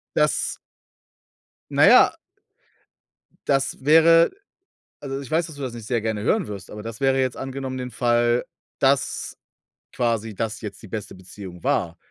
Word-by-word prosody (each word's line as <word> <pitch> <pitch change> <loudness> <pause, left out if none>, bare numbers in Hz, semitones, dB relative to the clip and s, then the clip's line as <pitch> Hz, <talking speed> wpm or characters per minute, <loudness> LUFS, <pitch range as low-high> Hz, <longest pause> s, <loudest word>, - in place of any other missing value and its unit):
Dass - - +1 1.1
na - - +4
ja - - +7 1.3
das 135 -1 0
wäre 165 +2 +6 0.7
also, 135 -1 -5
ich 135 - -10
weiß, 160 +1 +1
dass 160 - -10
du 140 - -9
das 130 -3 -4
nicht 115 -2 -8
sehr 120 -2 0
gerne 110 -1 -2
hören 205 - +1
wirst, 100 -3 -8
aber 105 - -7
das 115 +1 -7
wäre 135 0 +3
jetzt 130 -1 -1
angenommen 135 -1 -5
den 125 -1 -5
Fall, 120 0 +2 0.4
dass - - +1 0.5
quasi 115 -3 -1
das 110 +2 -3
jetzt 105 -3 -7
die - - -9
beste 105 -1 -6
Beziehung 95 -1 -11
war. 85 0 0
120 Hz, 155 wpm, -23 LUFS, 105-135 Hz, 1.3 s, ja